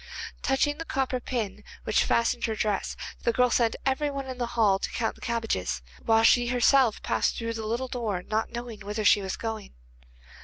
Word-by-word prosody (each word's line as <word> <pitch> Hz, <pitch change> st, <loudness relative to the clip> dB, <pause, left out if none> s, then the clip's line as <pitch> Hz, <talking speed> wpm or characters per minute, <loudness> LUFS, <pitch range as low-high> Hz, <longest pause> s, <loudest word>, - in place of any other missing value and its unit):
Touching 290 Hz, +2 st, +1 dB
the -, -, -2 dB
copper 265 Hz, -3 st, -1 dB
pin 210 Hz, -5 st, -4 dB, 0.2 s
which 215 Hz, -, +2 dB
fastened 235 Hz, +1 st, +1 dB
her 220 Hz, -, -1 dB
dress, 210 Hz, -2 st, -1 dB, 0.2 s
the 235 Hz, -, +2 dB
girl 250 Hz, +1 st, +3 dB
sent 230 Hz, -2 st, +2 dB
every 275 Hz, +2 st, +1 dB
one 275 Hz, -1 st, -4 dB
in 260 Hz, -1 st, -7 dB
the 240 Hz, -, -1 dB
hall 200 Hz, -4 st, +4 dB
to -, -, -3 dB
count 225 Hz, -2 st, -1 dB
the -, -, -20 dB
cabbages, 225 Hz, -, -2 dB, 0.2 s
while 225 Hz, 0 st, +4 dB
she 240 Hz, +1 st, +5 dB
herself 250 Hz, -1 st, +3 dB
passed -, -, 0 dB
through 230 Hz, 0 st, -3 dB
the 220 Hz, -1 st, -4 dB
little 240 Hz, +4 st, -1 dB
door, 220 Hz, -8 st, -3 dB
not 220 Hz, +3 st, -1 dB
knowing 235 Hz, -2 st, -6 dB
whither 210 Hz, +1 st, -4 dB
she 205 Hz, -, +6 dB
was 190 Hz, -1 st, -4 dB
going. 220 Hz, -, -5 dB
230 Hz, 195 wpm, -27 LUFS, 215-250 Hz, 0.2 s, she